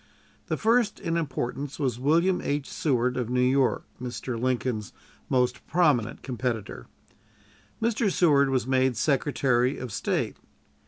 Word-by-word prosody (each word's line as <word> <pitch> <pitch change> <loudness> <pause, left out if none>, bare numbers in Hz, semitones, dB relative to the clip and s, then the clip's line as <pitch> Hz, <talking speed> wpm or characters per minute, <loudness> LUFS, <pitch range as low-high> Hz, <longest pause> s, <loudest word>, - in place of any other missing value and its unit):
The - - -1
first 225 -1 +2
in 165 - -2
importance 140 -2 -3
was 130 -6 -1
William 170 +7 +2
H. 145 -1 -2
Seward, 125 -7 0
of 120 -2 -2
New 125 0 0
York, 130 +1 +2 0.2
Mr. 120 -1 -4
Lincoln's 125 -4 -1 0.4
most 125 -2 0
prominent 150 -10 +1
competitor. 120 - -4 0.9
Mr. 225 -2 +1
Seward 145 -6 +4
was 130 -3 0
made 130 -1 +2
Secretary 135 -3 +1
of 130 -3 -6
State. - - -1
130 Hz, 125 wpm, -26 LUFS, 125-150 Hz, 0.9 s, Seward